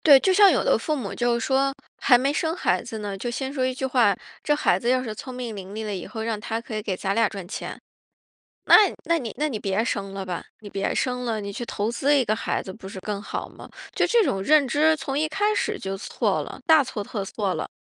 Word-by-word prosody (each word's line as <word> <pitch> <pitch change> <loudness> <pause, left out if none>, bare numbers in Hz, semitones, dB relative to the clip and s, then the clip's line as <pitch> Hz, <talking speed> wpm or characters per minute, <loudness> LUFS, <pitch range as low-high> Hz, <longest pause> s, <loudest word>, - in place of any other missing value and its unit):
对， 280 -4 +9
就 380 - +3
像 400 +1 +7
有 - - +2
的 - - +3
父 310 - -1
母 240 -9 -4
就 240 0 +1
是 235 - -1
说 270 +2 +1 0.3
还 250 - +7
没 270 +3 +1
生 320 +2 0
孩 - - +1
子 230 -2 -6
呢， 205 -2 -4
就 240 +5 -4
先 265 +2 -3
说 260 -3 0
一 260 - -1
句 265 - -4
话：” 240 -6 +3 0.3
这 295 - +3
孩 190 -10 +2
子 235 - -3
要 255 0 +2
是 220 -4 -5
聪 255 +3 -8
明 240 -4 -5
伶 195 0 -8
俐 220 +1 -5
了 210 - -3
以 185 - -5
后 220 -2 -6
让 225 -1 -2
他 225 +2 -3
可 230 -2 -7
以 215 - -3
给 205 -3 -2
咱 195 +1 -1
俩 230 0 +4
赚 195 -3 -7
钱“。 - - -6 0.9
那 - - +7 0.3
那 335 +1 +2
你 235 -7 -5
那 300 +1 +1
你 230 - -3
别 195 +1 0
生 200 -5 -3
了 195 -1 -5
吧， 175 -2 -4 0.2
你 210 - -9
别 195 0 -2
生 250 -1 -1
了， 225 -3 -1
你 200 0 -5
去 240 - -4
投 215 -1 -2
资 280 +5 +2
一 260 - +2
个 215 - +1
孩 - - -1
子 190 - -7
不 190 -2 -10
是 195 - -8
更 205 0 -4
好 - - -5
吗？ - - -13 0.2
就 - - +2
这 475 -1 +4
种 195 - -1
认 300 +3 +5
知 310 +5 +3
从 270 -1 -4
一 310 +1 +1
开 410 +6 +1
始 425 0 -1
就 195 0 -4
错 195 - -1
了， - - -8
大 315 -2 +7
错 215 -4 -4
特 200 0 -4
错 195 -1 -2
了。 - - -3
235 Hz, 290 characters per minute, -24 LUFS, 205-275 Hz, 0.9 s, 对